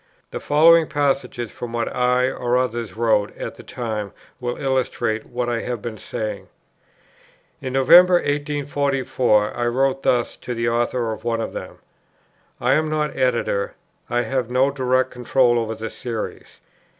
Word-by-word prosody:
The - - -4
following 160 +2 +5
passages 135 -5 -1
from 120 -1 -7
what 120 0 -2
I 125 +1 +2
or 125 0 0
others 120 -3 -2
wrote 110 -3 +1
at - - -5
the - - -13
time 110 -5 -5 0.3
will 120 0 -3
illustrate 130 -5 -1
what 120 0 -3
I 120 -1 -1
have 120 -2 -3
been 110 0 -6
saying: 110 -1 -5 1.1
In 130 -1 -4
November, 175 +7 +7
1844, 140 -7 0
I 120 0 -1
wrote 135 +2 +1
thus 120 -3 +1
to 125 - -5
the 115 0 -1
author 120 0 0
of 110 - -10
one 115 -1 -1
of 115 - -4
them: - - -7 0.8
"I 125 +2 +2
am 155 +2 +1
not 150 -1 -1
Editor, 120 -6 0 0.3
I 120 0 +1
have 125 0 -2
no 130 +3 +2
direct 130 -1 +1
control 125 0 +2
over 110 -1 -3
the 110 +1 -6
Series. 115 -3 -6
125 Hz, 155 wpm, -22 LUFS, 115-135 Hz, 1.1 s, November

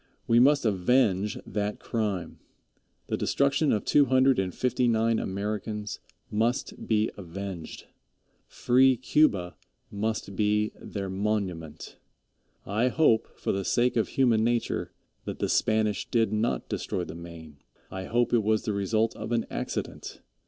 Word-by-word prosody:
We 115 0 +4
must 140 +1 +4
avenge 105 0 +2
that 105 0 -3
crime. 100 -7 -3 0.7
The - - -2
destruction 140 +2 +1
of 105 - 0
two 145 -1 +5
hundred 130 -1 +4
and 95 -1 -1
fifty 125 +4 0
nine 115 0 +2
Americans 105 +2 -4 0.3
must 115 +4 -1
be 110 -1 +2
avenged. 95 -2 -7 0.6
Free 130 +1 +3
Cuba 110 -9 +2 0.3
must 105 -1 -3
be 105 +1 +1
their 100 -2 -5
monument. 95 -6 -3 0.7
I 110 +5 +1
hope 125 -4 +3
for - - -1
the 95 0 -1
sake 120 +5 +1
of 115 - +1
human 120 -5 +2
nature 120 0 -1 0.3
that - - -5
the - - -1
Spanish 110 -2 +1
did 115 -3 +1
not 110 +2 -1
destroy 90 - -3
the 80 - -7
Maine. 85 -3 -10 0.3
I 95 0 -5
hope 120 +3 +1
it 120 - +4
was 110 0 +1
the 105 - -2
result 110 +3 0
of - - -6
an 115 -1 +1
accident. - - -5
110 Hz, 140 wpm, -27 LUFS, 100-120 Hz, 0.7 s, two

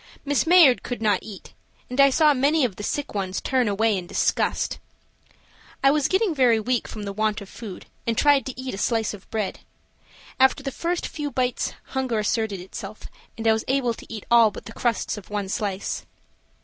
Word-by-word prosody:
Miss 285 -1 +1
Mayard 330 -8 +7
could 245 - -5
not 210 -4 +2
eat, 205 -4 -11 0.3
and 250 +2 +2
I 275 - +7
saw 300 +2 +4
many 285 +2 +3
of 215 -7 -3
the - - -8
sick 290 +7 -3
ones 190 -2 -2
turn 255 -3 +1
away 215 +1 +2
in 180 -2 -4
disgust. - - 0 1.0
I 275 - +6
was 295 -1 +2
getting 380 -1 +1
very 250 -6 +4
weak 245 +2 -1
from 215 - -7
the 200 -1 -4
want 215 +1 0
of 200 - -10
food 205 -3 -9 0.2
and 230 -1 0
tried 285 -2 +4
to 260 -1 -6
eat 260 0 -4
a 195 - -5
slice 225 -1 0
of 200 -2 -12
bread. 215 -3 -3 0.8
After 265 +2 +4
the 275 - -3
first 345 +5 -2
few 295 -2 -4
bites 250 -1 -1 0.2
hunger 260 -4 -1
asserted 215 -1 -1
itself, 195 +3 -8 0.3
and 225 - -6
I 220 - +6
was 220 - -1
able 255 -3 +1
to - - -13
eat 220 -3 -7
all 230 -2 +7
but - - -10
the 225 - -9
crusts 235 -2 -1
of 205 - -10
the - - -12
one 205 -2 -2
slice. 200 -1 -3
230 Hz, 205 wpm, -24 LUFS, 210-270 Hz, 1.0 s, Mayard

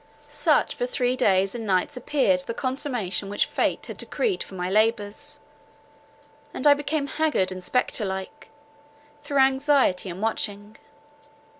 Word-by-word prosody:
Such - - +2
for - - -2
three 255 - 0
days 195 -6 +2
and 235 -2 -5
nights 195 +7 0
appeared 250 -8 +1
the 230 +6 0
consummation 245 -8 -2
which 205 - +1
fate - - -1
had - - -8
decreed 430 -7 -2
for 190 - -7
my 180 -1 -3
labours, 215 +7 0 1.2
and - - -1
I 290 - +9
became 290 0 -2
haggard 280 -11 0
and 185 0 -6
spectre 250 +2 0
like, 190 -1 -5 0.7
through 285 -1 -3
anxiety 265 -7 +3
and 175 +1 -7
watching. 210 -1 -3
230 Hz, 140 wpm, -25 LUFS, 190-285 Hz, 1.2 s, I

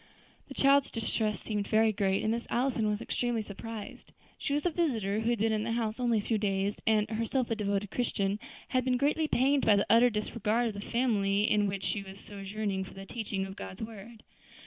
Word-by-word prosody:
The 270 - -9
child's 275 0 +4
distress 220 -2 -1
seemed 210 -2 -2
very 220 0 +4
great, 195 -2 +1
and 215 - +1
Miss 235 +1 -2
Allison 240 -3 +1
was 210 0 -1
extremely 240 -3 -1
surprised. 210 +1 -8 0.3
She - - -3
was 295 +3 0
a 355 - +3
visitor 225 - 0
who 225 +1 0
had 240 - +2
been 220 +1 +1
in 215 -1 0
the 230 +1 -1
house 230 0 -1
only 240 -2 +2
a - - +1
few 220 -1 0
days, 200 0 0
and, 215 -1 +3
herself 230 +3 -1
a - - +2
devoted 205 -1 -1
Christian, 205 -4 0 0.3
had 255 0 +1
been 255 0 +2
greatly 300 +4 +1
pained 275 +1 +3
by 210 - +6
the 200 - +2
utter 235 +2 +7
disregard 225 +1 0
of - - -5
the 200 - -6
family 210 -5 +2
in 210 -1 +3
which 195 -1 -3
she 205 - -1
was 195 0 -11
sojourning 200 -1 -4
for 190 - -11
the 195 0 -8
teachings 200 -3 -3
of 190 - -9
God's 190 +2 -7
word. 220 +1 -10
220 Hz, 215 wpm, -30 LUFS, 200-235 Hz, 0.3 s, utter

